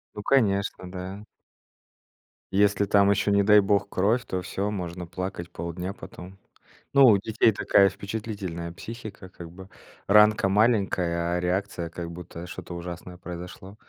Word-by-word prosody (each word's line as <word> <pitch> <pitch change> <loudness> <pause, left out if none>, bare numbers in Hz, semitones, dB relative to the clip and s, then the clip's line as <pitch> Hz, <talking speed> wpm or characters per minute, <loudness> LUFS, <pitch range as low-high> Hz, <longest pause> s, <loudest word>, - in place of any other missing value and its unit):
Ну, 105 - -5
конечно, 100 -7 +1
да. 95 +3 -7 1.3
Если 100 0 +3
там 100 0 +4
ещё, 100 0 +2
не 100 0 +4
дай 105 +1 +6
бог, 100 0 +1
кровь, 110 +6 +1
то 95 - -2
всё, 100 +3 -3
можно 90 -3 -5
плакать 90 -1 -5
полдня 85 +3 -5
потом. 95 -1 -11 0.6
Ну, 140 -1 +7
у 105 -4 +7
детей 110 +2 +2
такая 100 -1 +4
впечатлительная 100 -4 -5
психика, 110 0 -9
как 85 -3 -11
бы 95 +2 -12 0.4
ранка 105 -1 +5
маленькая, 95 -5 +1
а - - -1
реакция 90 -1 -2
как 85 0 -7
будто 85 0 -9
что-то 90 0 -8
ужасное 90 +1 -8
произошло. 90 +2 -9
95 Hz, 145 wpm, -26 LUFS, 90-105 Hz, 1.3 s, Ну